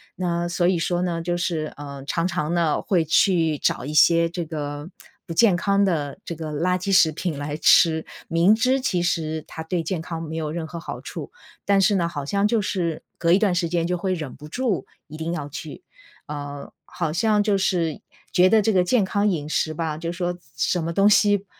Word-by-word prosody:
那 175 -1 -1
所 175 0 +1
以 180 -1 +2
说 175 +1 0
呢， 170 -2 -1
就 175 +1 -1
是， 160 -3 -2
呃， 140 -1 -8
常 170 +5 -1
常 155 -3 -2
呢 170 -3 +1
会 175 -5 +1
去 165 -1 +3
找 125 - -1
一 150 - -5
些 165 +3 +5
这 175 +1 -4
个 145 0 -5 0.4
不 165 - -4
健 200 +1 +5
康 200 +3 +2
的 150 -7 -1
这 170 - -6
个 155 -1 -6
垃 180 +5 0
圾 195 +2 -2
食 175 -4 +5
品 160 0 -3
来 145 +1 -4
吃。 160 0 +4 0.2
明 170 +6 +4
知 255 +4 +2
其 180 -9 0
实 160 -3 -1
它 160 - -8
对 170 0 -2
健 165 +1 -3
康 165 0 -5
没 160 0 -6
有 155 -2 -2
任 165 0 -4
何 170 +1 -7
好 - - -7
处， - - -7 0.3
但 200 -1 +3
是 205 +1 +3
呢， 170 -3 +1
好 145 -4 -5
像 200 +8 +1
就 225 0 +1
是 175 -5 -2
隔 170 0 +3
一 - - +6
段 205 -4 +2
时 175 -1 0
间， 170 0 0
就 180 0 -1
会 185 +1 -1
忍 150 -7 -5
不 150 - -11
住 230 +3 -1 0.2
一 155 0 -10
定 160 +1 -3
要 145 -4 -4
去， 160 - -8 0.4
呃， 145 -1 -7
好 165 -3 -3
像 210 +5 +2
就 205 -2 +2
是 175 -5 0 0.3
觉 180 0 +5
得 220 +3 +5
这 220 - +2
个 185 -3 +3
健 220 +3 +3
康 200 +2 0
饮 155 -6 -2
食 155 0 0
吧， 155 -1 -3
就 165 +1 -4
说 175 0 -2
什 175 - -14 0.3
什 175 - +1
么 165 +1 -3
东 200 +4 +4
西 205 -1 +3
170 Hz, 240 characters per minute, -23 LUFS, 155-185 Hz, 0.4 s, 一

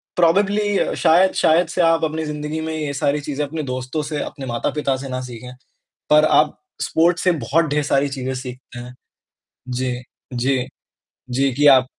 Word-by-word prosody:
Probably 200 +4 +2
शायद 175 +3 +4
शायद 165 +2 +3
से 175 - 0
आप 165 -1 +3
अपनी 160 0 -1
ज़िंदगी 150 +1 -4
में 160 0 -4
ये 150 -2 -3
सारी 140 +1 0
चीज़ें 145 0 -3
अपने 155 +2 -5
दोस्तों 130 +3 -3
से, 150 0 -3
अपने 135 - -7
माता-पिता 135 +3 -1
से 135 +1 -7
ना 130 0 -3
सीखें। 125 0 -9 0.6
पर 150 0 +6
आप 150 0 +3 0.2
स्पोर्ट्स 170 +1 +2
से 185 - +4
बहुत 160 +8 +2
ढेर 150 0 +1
सारी 140 0 +1
चीज़ें 130 -1 -4
सीखते 125 -1 -8
हैं। 125 +1 -9 0.8
जी, 125 0 -2 0.4
जी। 130 +1 0 0.6
जी, 135 +2 +1
कि 145 +3 +1
आप 130 -2 +7
145 Hz, 170 wpm, -20 LUFS, 130-160 Hz, 0.8 s, आप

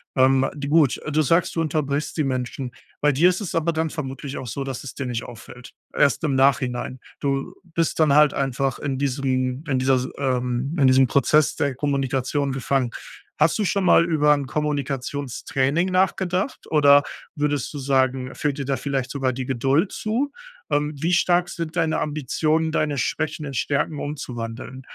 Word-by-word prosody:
Ähm, 130 0 +4
di 140 -1 -5
gut, 150 -3 +3
du 155 +1 +2
sagst, 165 +5 +2
du 165 - +1
unterbrichst 150 -1 -2
die 155 - +2
Menschen. 130 -1 -3 0.3
Bei 145 0 +3
dir 165 +7 +4
ist 185 +3 -1
es 195 - -4
aber 165 0 +1
dann 160 -1 -1
vermutlich 135 -2 -5
auch 130 - -7
so, 135 +4 -4
dass 135 -1 -5
es 135 - -8
dir 140 - -4
nicht 120 -2 -3
auffällt. 120 +1 -11 0.2
Erst 140 - +2
im 150 -3 +1
Nachhinein. 130 -1 +1 0.2
Du 135 -1 -2 0.2
bist 165 -1 0
dann 155 -3 +4
halt 150 -1 +6
einfach 135 -1 -1
in 135 -2 -2
diesem 130 -1 -1
in 130 - +2
dieser 130 0 +3
Si 130 - -4
ähm, 125 +1 -1
in 135 - +5
diesem 130 0 +6
Prozess 145 +4 +3
der 140 -4 -1
Kommunikation 140 0 -1
gefangen. 130 -1 0 0.5
Hast 160 - +3
du 215 - 0
schon 200 0 0
mal 170 - +6
über 150 -3 +3
'n 140 -2 -2
Kommunikationstraining 140 +2 -1
nachgedacht 185 +3 0
oder 145 -2 +6 0.3
würdest 145 -3 -1
du 145 - -5
sagen, 130 -1 +1
fehlt 145 -3 -1
dir 140 - -3
da 135 - 0
vielleicht 135 -2 -3
sogar 135 -2 0
die 130 +1 -4
Geduld 135 - +1
zu? 245 +7 -1 0.4
Ähm, 150 +1 0
wie 170 +2 +1
stark 175 0 +3
sind 165 0 -5
deine 160 -1 +1
Ambitionen, 155 +2 0
deine 150 -3 0
Schwächen 155 +4 -2
in 140 - -6
Stärken 140 +4 -1
umzuwandeln? 130 -3 -6
140 Hz, 180 wpm, -23 LUFS, 130-155 Hz, 0.5 s, halt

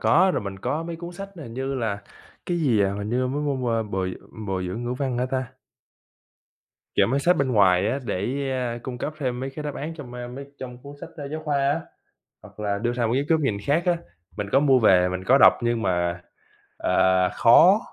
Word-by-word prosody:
có, 185 +4 +4
rồi - - 0
mình 100 -1 -6
có 155 +10 -2
mấy 165 0 -5
cuốn 175 +1 -8
sách 195 +2 -7
hình 120 -8 -9
như 135 +1 -3
là 105 -5 -2 0.4
cái 175 -1 0
gì, 120 -9 +3
à, 100 0 +2
hình 105 - -4
như 125 +1 +1
mấy 140 +3 -2 0.2
môn, 125 -2 -1
a, 115 - +1
bồi 95 -3 -3 0.3
bồi 95 -1 -2
dưỡng 95 +7 -4
ngữ 120 - -2
văn 130 -2 -2
hả 125 - 0
ta? 130 -1 -3 1.4
Chọn - - +3
mấy 140 - +1
sách 175 +5 +3
bên 130 -2 0
ngoài 95 -3 +4
á 135 - 0
để, 125 +7 -2
ơ, 125 -2 -2
cung 125 -2 -6
cấp 150 - -3
thêm 125 -4 -2
mấy 135 - -3
cái 150 +3 -7
đáp 145 -2 -4
án 160 +3 -5
trong, 140 -6 -9
a, 120 0 -6
mấy 135 +3 -8
trong 125 -1 -8
cuốn 140 +1 -10
sách, 165 - -8
ơ, 145 -3 -6
giáo 155 +1 -5
khoa 145 -2 0
á, 140 +3 +1 0.6
hoặc - - -15
là 100 -1 -1
đưa 120 +3 -1
ra 120 -1 0
một 115 - 0
ít 135 +3 +1
góc 160 -1 +4
nhìn 135 -9 0
khác 155 +5 +2
á, 175 -1 +2 0.4
mình 105 -1 -3
có 135 - +5
mua 135 -3 +4
về, 90 -5 +5
mình 90 0 -4
có 130 - +6
đọc - - +8
nhưng 120 -1 0
mà, 85 -3 0 0.6
à, 95 0 +3
khó. 180 - +6
125 Hz, 240 wpm, -24 LUFS, 105-145 Hz, 1.4 s, đọc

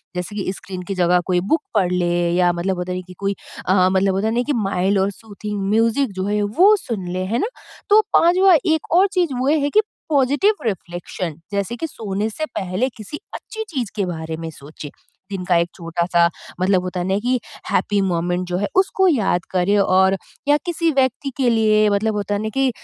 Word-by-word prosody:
जैसे 180 +3 -4
कि 185 - -2
स्क्रीन 185 0 -8
की 195 - -3
जगह 180 0 +3
कोई 180 -1 +2
बुक 315 -1 +3
पढ़ 185 -4 +2
ले 175 -1 +1
या 180 -1 +4
मतलब 180 +2 -2
होता 180 +1 -4
है 180 - -3
ना, - - -8
कि 185 - -10
कोई 200 0 -1 0.3
अ, 185 0 +4
मतलब 190 0 +2
होता 200 +3 0
है 225 - 0
ना, 245 - +2
कि 290 - -1
माइल्ड 195 -3 +1
और 195 +1 +1
सूथिंग 210 -1 -7
म्यूजिक 230 +3 +2
जो 190 0 -3
है 210 0 0
वो 360 - +5
सुन 220 - -5
ले, 185 0 -2
है 225 +6 -1
ना? 430 - 0 0.4
तो 420 +1 +7
पाँचवाँ 365 +2 +5 0.2
एक 315 - -3
और 385 +3 +6
चीज़ 350 -7 +1
वो 260 - 0
है 290 -2 +2
कि 430 - +4 0.3
पॉज़िटिव 290 +9 +3
रिफ्लेक्शन 175 -4 -4
जैसे 200 +3 -2
कि 325 +6 -4
सोने 210 -4 -3
से 310 +8 -3
पहले 190 +7 -1
किसी 220 +8 -8 0.2
अच्छी 440 0 -6
चीज़ 255 - -3
के 200 - 0
बारे 160 -2 -5
में 165 0 -5
सोचे, 145 0 -10 0.4
दिन 190 -2 -3
का 180 - +2
एक 170 0 +1
छोटा-सा 170 0 +1 0.3
मतलब 185 -1 +3
होता 180 0 -4
है 175 - -2
ना 190 - +1
कि 250 +3 0 0.3
हैप्पी 205 -1 +1
मोमेंट 180 -1 -1
जो 180 0 -1
है 205 - -1
उसको 380 0 +3
याद 210 - +1
करें 185 +2 +2
और 190 0 +3 0.3
या 290 0 +5
किसी 335 -1 0
व्यक्ति 265 +1 +1
के 255 -3 +2
लिए 215 -2 +3
मतलब 210 +2 0
होता 205 0 -1
है 205 - -2
ना 220 - -2
कि 270 -1 +3
200 Hz, 215 wpm, -20 LUFS, 180-255 Hz, 0.4 s, तो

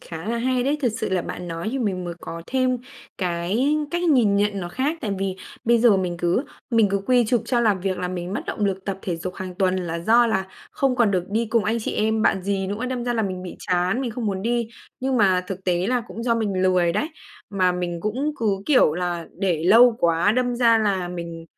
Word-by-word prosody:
khá 165 +2 -8
là 235 - 0
hay 255 +1 +1
đấy. 285 +4 0
Thật 250 - +3
sự - - -2
là 185 -2 0
bạn 180 +1 -6
nói 165 +4 -4
thì 270 - -1
mình 190 -6 -1
mới 175 -1 -5
có 165 0 -7
thêm 255 -1 +1 0.4
cái 190 - 0
cách 345 0 -1
nhìn 250 - +4
nhận 205 -1 +1
nó 175 - -4
khác. 275 - -2
Tại 215 - -3
vì 195 -1 -2 0.3
bây 235 0 +4
giờ 225 -3 +5
mình 180 -2 -2
cứ 175 +9 +1 0.3
mình 225 -3 +4
cứ 200 - +1
quy 250 -1 +4
chụp 235 0 +1
cho 240 0 +1
làm 210 -5 +2
việc 190 0 -2
làm 180 0 -3
mình 175 +1 -4
mất - - -2
động 210 - -2
lực 195 -1 -2
tập 195 -1 -3
thể 175 -3 -2
dục 180 +2 -6
hàng 185 -1 -6
tuần, 185 0 +1
là 170 -3 -3
do 230 +7 +4
là 190 -4 0 0.2
không 270 -2 0
còn 235 -4 +3
được 185 -3 0
đi 225 +3 0
cùng 225 0 +1
anh 225 +2 0
chị - - -3
em, 220 +1 +1
bạn 190 -4 +2
dì 195 0 -1
nữa, 205 +6 -3
đâm 250 -2 -3
ra 245 0 -1
là 225 - +1
mình 185 -2 -3
bị 180 - -8
chán, 180 +5 0
mình 255 -3 -2
không 235 0 -4
muốn 195 -2 -2
đi. 235 0 0 0.3
Nhưng 260 0 0
mà 190 -5 +3
thực 190 0 -6
tế 180 0 +1
là 250 +2 +1
cũng 230 - -7
do 235 -1 +2
mình 205 -5 -1
lười 180 -2 +3
đấy, 300 - -1 0.4
mà 185 -3 +2
mình 175 -1 -3
cũng 255 - -1
cứ 200 -4 0
kiểu 255 - +4
là 175 -1 -3
để 175 -5 0
lâu 230 +5 +7
quá, 170 +4 +3
đâm 245 +1 0
ra 230 -2 +5
là 195 -5 0
mình 170 -2 -6
200 Hz, 250 wpm, -23 LUFS, 180-235 Hz, 0.4 s, lâu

